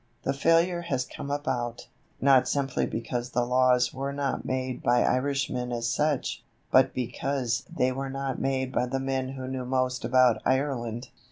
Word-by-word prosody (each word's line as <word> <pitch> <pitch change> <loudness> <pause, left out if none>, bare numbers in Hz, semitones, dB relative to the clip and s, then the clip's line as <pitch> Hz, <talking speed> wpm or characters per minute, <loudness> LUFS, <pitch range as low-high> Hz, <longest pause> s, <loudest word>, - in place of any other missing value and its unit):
The 135 - 0
failure 165 +4 +3
has 135 -7 -1
come 140 - -8
about, 125 -4 -2 0.3
not 135 -2 +5
simply 140 -2 0
because 120 +2 -3
the 120 -1 0
laws 125 0 +3
were 135 +1 -3
not 140 -1 -2
made 130 -1 -2
by 120 0 +3
Irishmen 130 -2 0
as 120 -1 -1
such, 150 +2 0 0.3
but - - +5
because 125 -1 -2
they 130 0 +1
were 135 +1 -4
not 135 -1 -3
made 130 -1 0
by 125 -1 0
the 135 +2 -2
men 135 0 -2
who 130 -1 -6
knew 130 -1 -3
most 130 0 -1
about 125 -2 +4
Ireland. 130 -3 -1
130 Hz, 165 wpm, -27 LUFS, 125-135 Hz, 0.3 s, not